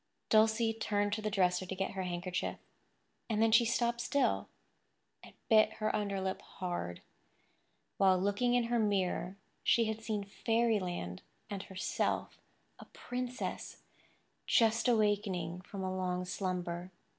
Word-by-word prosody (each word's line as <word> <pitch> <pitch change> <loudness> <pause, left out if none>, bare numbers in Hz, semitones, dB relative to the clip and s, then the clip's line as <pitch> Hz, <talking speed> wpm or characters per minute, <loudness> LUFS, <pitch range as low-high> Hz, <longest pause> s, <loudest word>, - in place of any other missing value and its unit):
Dulcie 225 +1 +4
turned 205 -2 0
to 215 - -1
the 215 - -1
dresser 185 -3 +2
to 190 - -4
get 195 +1 -2
her 190 - -4
handkerchief; 180 0 -3 0.7
and 215 -2 0
then 225 0 +4
she 230 +2 +6
stopped 235 +1 +1
still, 280 +3 +1 0.7
and - - -14
bit 215 -1 +5
her 215 - -1
underlip 195 -2 -2
hard. 175 - -5 0.9
While 190 -1 +5
looking 205 +6 +1
in 245 - +3
her 235 0 +1
mirror 195 -3 0 0.3
she 230 - +4
had 220 0 -3
seen 215 -2 -2
fairyland 200 - -1 0.3
and 200 -1 -3
herself, 190 -1 -2 0.4
a - - -10
princess, 250 0 -5 0.6
just 225 +1 +4
awakening 205 -6 +1
from 195 +1 -7
a 185 0 -2
long 180 -1 -1
slumber. 180 -1 -3
205 Hz, 135 wpm, -33 LUFS, 185-225 Hz, 0.9 s, she